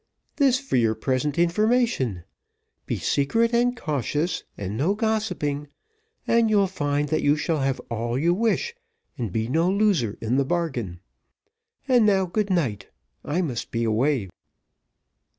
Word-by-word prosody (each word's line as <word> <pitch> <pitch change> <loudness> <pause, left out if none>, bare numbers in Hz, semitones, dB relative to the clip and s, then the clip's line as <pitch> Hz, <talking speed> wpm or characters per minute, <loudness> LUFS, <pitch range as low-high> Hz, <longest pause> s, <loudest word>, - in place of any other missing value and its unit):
"This 265 -3 +4
for 275 - -1
your 115 -2 +2
present 130 +5 -1
information. 175 - +1 0.6
Be - - -1
secret 230 - +1
and 245 +1 +2
cautious, 155 - -2
and 100 +1 -4
no 160 - +1
gossiping, 185 -10 -1 0.6
and 230 -1 +3
you'll 205 -2 +4
find 145 -5 -1
that 155 - +1
you 145 +1 +3
shall 155 0 -1
have 135 -1 0
all 115 +1 -3
you 170 +5 +2
wish, 230 - 0 0.5
and 115 -6 -2
be 110 +3 -1
no 165 +7 +2
loser 195 - +1
in 115 +3 0
the 140 - +3
bargain. 130 - -2 0.9
And 245 -5 +4
now, 195 -2 +3
good 205 +3 -1
night 125 - -1 0.4
I 170 +5 -1
must 125 -8 -4
be 115 0 -2
away. 115 -1 +1
150 Hz, 145 wpm, -24 LUFS, -, 0.9 s, This